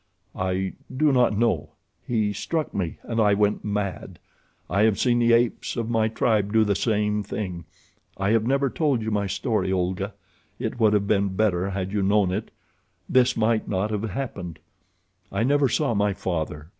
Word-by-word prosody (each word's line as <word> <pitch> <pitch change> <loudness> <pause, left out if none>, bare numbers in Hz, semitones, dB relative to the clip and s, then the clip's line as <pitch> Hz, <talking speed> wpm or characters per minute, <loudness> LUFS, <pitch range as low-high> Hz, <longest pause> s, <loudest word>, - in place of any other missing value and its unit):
"I 95 0 -1 0.2
do 145 +3 +2
not 125 -5 +3
know. 115 +1 0 0.3
He 110 -4 0
struck 160 +7 -3
me, 90 -5 -3
and 115 -1 -1
I 105 -2 +4
went 105 0 +1
mad. 105 -2 -3 0.5
I 100 +5 +1
have 110 -2 +3
seen 120 -1 +2
the 120 0 +3
apes 115 0 +1
of 115 0 -2
my 110 -1 +2
tribe 110 -2 +1
do 110 0 +4
the 105 -1 +1
same 105 -1 0
thing. 90 -4 -5 0.5
I 100 +2 0
have 115 -1 +3
never 140 +1 +2
told 140 -8 0
you 110 - -2
my 100 -1 0
story, 100 +1 -1
Olga. 95 +2 -1 0.4
It - - -4
would 110 -2 +4
have 100 -1 +2
been 100 -2 +1
better 95 -3 +1
had 95 -1 -3
you 105 -1 0
known 100 -1 +2
it—this 120 +4 -2
might 110 0 +1
not 100 +2 -1
have 105 +1 -2
happened. 95 - -5 0.7
I 100 +3 0
never 140 +1 +3
saw 140 0 +1
my 105 -2 +1
father. 80 -4 -4
105 Hz, 175 wpm, -24 LUFS, 95-115 Hz, 0.7 s, I